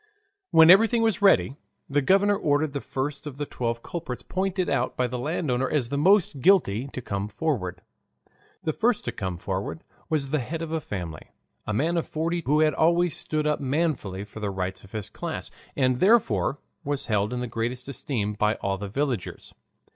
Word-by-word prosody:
When 160 +1 +8
everything 225 +4 +5
was 220 -4 +1
ready, 195 -8 +4 0.3
the 145 +1 +1
governor 200 +7 +4
ordered 150 -5 +1
the 140 - -3
first 140 +2 -4
of 140 -2 -7
the 145 - -2
twelve 115 -3 -3
culprits 160 -8 -5
pointed 190 -1 -1
out 135 -3 0
by 125 - +2
the 125 0 -3
landowner 135 -3 -1
as 135 -6 0
the 140 - -2
most 190 -3 +3
guilty 140 - +3
to 130 -3 -7
come 100 -1 -3
forward. 105 - -2 0.8
The 155 - 0
first 235 +4 +1
to - - -1
come 95 -3 -4
forward 95 - -4 0.3
was 145 -4 0
the 155 - +2
head 160 +6 -4
of 160 - -5
a 160 -1 -1
family, 85 - -6 0.4
a 110 - -1
man 165 +8 +1
of 165 - -1
forty 165 +2 -1
who 150 +3 +3
had 155 -1 +4
always 170 +2 +3
stood 155 -1 -2
up 150 0 +1
manfully 135 - -1
for 105 +1 -10
the 105 -2 -2
rights 95 -1 -4
of 100 - -16
his 110 -3 -4
class, - - -6 0.2
and 130 -2 +2
therefore 150 - +3 0.3
was 145 -1 -2
held 105 -1 0
in 125 - -2
the 125 - -2
greatest 120 +2 -3
esteem 115 -6 -3
by 105 +1 +1
all 95 -1 -2
the 100 0 -5
villagers. 130 -3 -3
140 Hz, 190 wpm, -26 LUFS, 110-160 Hz, 0.8 s, When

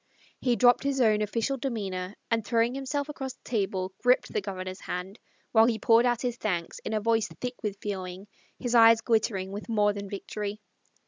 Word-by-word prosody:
He 245 -2 +2
dropped 245 +1 +5
his 275 -1 0
own 215 -3 +4
official 230 +6 -1
demeanor 200 -7 -3 0.2
and 225 -1 +2
throwing 230 +2 +1
himself 275 +2 -2
across 270 -3 -5
the - - -33
table 190 -4 -2
gripped 250 +1 +2
the - - 0
Governor's 185 -1 -5
hand 185 +4 -5 0.3
while 225 -1 +6
he 230 -2 +1
poured 230 +1 +4
out 240 0 0
his 245 -1 -1
thanks 175 -7 -2
in - - -5
a 215 - +1
voice 225 0 +1
thick 250 0 -5
with 205 -2 -3
feeling, 190 -2 -5 0.3
his 245 -2 -3
eyes 230 -1 +7
glittering 215 -5 0
with 205 +4 -7
more 210 -2 +3
than 200 -1 -6
victory. 205 +1 -5
220 Hz, 190 wpm, -28 LUFS, 200-245 Hz, 0.3 s, eyes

